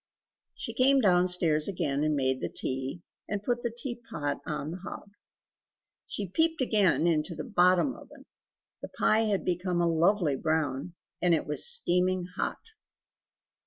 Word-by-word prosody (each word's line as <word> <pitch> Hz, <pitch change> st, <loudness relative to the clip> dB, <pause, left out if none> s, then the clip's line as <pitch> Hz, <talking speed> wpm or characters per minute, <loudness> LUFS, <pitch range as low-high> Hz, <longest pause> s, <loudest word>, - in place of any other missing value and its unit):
She -, -, -5 dB
came 270 Hz, +2 st, +4 dB
downstairs 180 Hz, -6 st, +3 dB
again, 150 Hz, -7 st, -1 dB
and 155 Hz, -1 st, +1 dB
made 130 Hz, -1 st, 0 dB
the -, -, -2 dB
tea, 135 Hz, +6 st, -4 dB, 0.3 s
and 205 Hz, -1 st, -3 dB
put 240 Hz, +1 st, -1 dB
the 235 Hz, -, -1 dB
teapot 230 Hz, -, -4 dB
on 150 Hz, 0 st, -3 dB
the 175 Hz, -, -5 dB
hob. 195 Hz, +2 st, -9 dB, 1.0 s
She 205 Hz, -, -4 dB
peeped 320 Hz, -, +1 dB
again 210 Hz, -9 st, +2 dB
into 165 Hz, 0 st, 0 dB
the -, -, -5 dB
BOTTOM 185 Hz, +1 st, +3 dB
oven, -, -, -15 dB, 0.6 s
the -, -, -6 dB
pie 220 Hz, +1 st, +2 dB
had 205 Hz, -3 st, -1 dB
become 180 Hz, 0 st, -1 dB
a 170 Hz, -, +2 dB
lovely 170 Hz, -1 st, +2 dB
brown, 155 Hz, +2 st, -2 dB, 0.3 s
and 175 Hz, -2 st, +4 dB
it 155 Hz, -, -2 dB
was 150 Hz, -, +2 dB
steaming 185 Hz, -, +1 dB
hot. -, -, -3 dB
180 Hz, 150 wpm, -28 LUFS, 155-210 Hz, 1.0 s, came